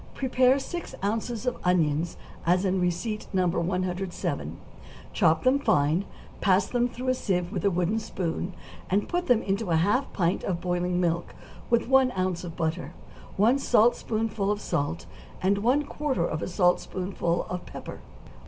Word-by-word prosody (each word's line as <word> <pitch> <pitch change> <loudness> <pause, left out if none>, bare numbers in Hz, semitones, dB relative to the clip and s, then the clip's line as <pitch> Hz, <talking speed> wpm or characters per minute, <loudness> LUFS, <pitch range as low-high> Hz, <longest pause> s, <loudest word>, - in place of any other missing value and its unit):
= - - -23
Prepare 260 0 +3
six 345 +5 -5
ounces 225 +3 -2
of 250 -1 -1
onions 170 -2 +1 0.3
as 180 +3 +2
in 190 -1 +1
receipt 180 +5 -2
No. 185 -1 +2
107; 180 +1 -2 0.6
chop 165 -5 +3
them 260 +2 +4
fine, 155 - +2 0.4
pass 190 -1 +4
them 245 +2 0
through 255 +2 -4
a - - +4
sieve 180 -7 -1
with - - -3
a 200 - +4
wooden 180 +4 0
spoon, 180 -2 -3 0.3
and 200 +3 +1
put 355 0 -1
them 245 -3 +4
into 200 +2 -1
half 200 +11 +2
a - - -17
pint 175 -1 0
of 175 -3 -1
boiling 180 0 -1
milk, 170 -1 -1 0.3
with 235 -1 +2
one 265 0 +5
ounce 185 -1 -1
of 170 -2 -7
butter, 160 +2 -2 0.4
one 230 +7 +4
saltspoonful 225 -3 +2
of 205 0 0
salt, 165 -4 -2 0.3
and 200 +2 +2
one 255 +7 +2
quarter 290 -2 -1
of 155 - -3
a - - -2
saltspoonful 180 -1 0
of 180 0 -5
pepper. - - -8
190 Hz, 160 wpm, -27 LUFS, 175-235 Hz, 0.6 s, one